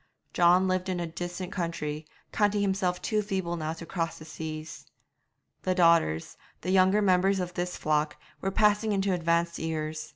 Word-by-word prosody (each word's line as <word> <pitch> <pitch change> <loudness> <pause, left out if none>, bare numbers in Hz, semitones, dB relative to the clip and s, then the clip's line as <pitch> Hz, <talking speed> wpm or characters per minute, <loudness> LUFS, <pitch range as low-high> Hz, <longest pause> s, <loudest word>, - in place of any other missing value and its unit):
John 180 +2 +5
lived 185 0 0
in 180 -1 -1
a 170 - -1
distant 175 +2 -5
country, 155 -4 -3 0.2
counting 205 -1 +2
himself 190 -2 0
too 215 -1 +1
feeble 190 -4 -2
now 160 -1 -3
to 165 +1 -9
cross 165 -2 -3
the 155 - -11
seas. 155 0 -7 0.7
The 185 -1 0
daughters, 165 - +3 0.2
the 185 - -2
younger 190 +2 +4
members 190 0 +3
of 180 -1 -3
this 180 0 -3
flock, 150 0 0 0.2
were 195 - 0
passing 210 +2 +2
into 195 -1 +1
advanced 170 0 0
years. 155 -1 -3
175 Hz, 165 wpm, -28 LUFS, 160-190 Hz, 0.7 s, John